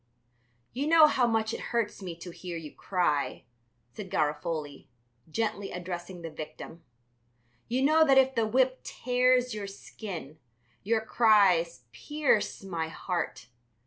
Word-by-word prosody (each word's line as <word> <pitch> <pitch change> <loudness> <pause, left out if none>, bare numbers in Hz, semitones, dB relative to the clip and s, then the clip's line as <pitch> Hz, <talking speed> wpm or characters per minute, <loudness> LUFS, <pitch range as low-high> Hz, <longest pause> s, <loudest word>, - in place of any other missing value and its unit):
"You 275 +5 -2
know 320 -1 +8
how 260 -5 +3
much 225 -1 0
it - - -4
hurts 230 -4 -1
me 180 -3 -6
to 175 - -7
hear 175 0 -7
you 155 -3 -9
cry," 175 -7 -1 0.5
said 200 -3 -8
Garofoli, 150 -3 -2 0.4
gently, 210 +1 -2
addressing 175 0 -6
the 165 - -6
victim. 155 +2 -9 0.8
"You 250 +3 0
know 310 +3 +5
that 270 -1 +5
if 265 0 +5
the 230 -3 +1
whip 255 +3 +2
tears 250 0 +1
your 210 -2 -5
skin, 185 -6 -8 0.4
your 220 +2 +1
cries 195 - +3
pierce 275 - 0
my 170 -4 -3
heart. 170 -5 -4
200 Hz, 135 wpm, -29 LUFS, 170-245 Hz, 0.8 s, know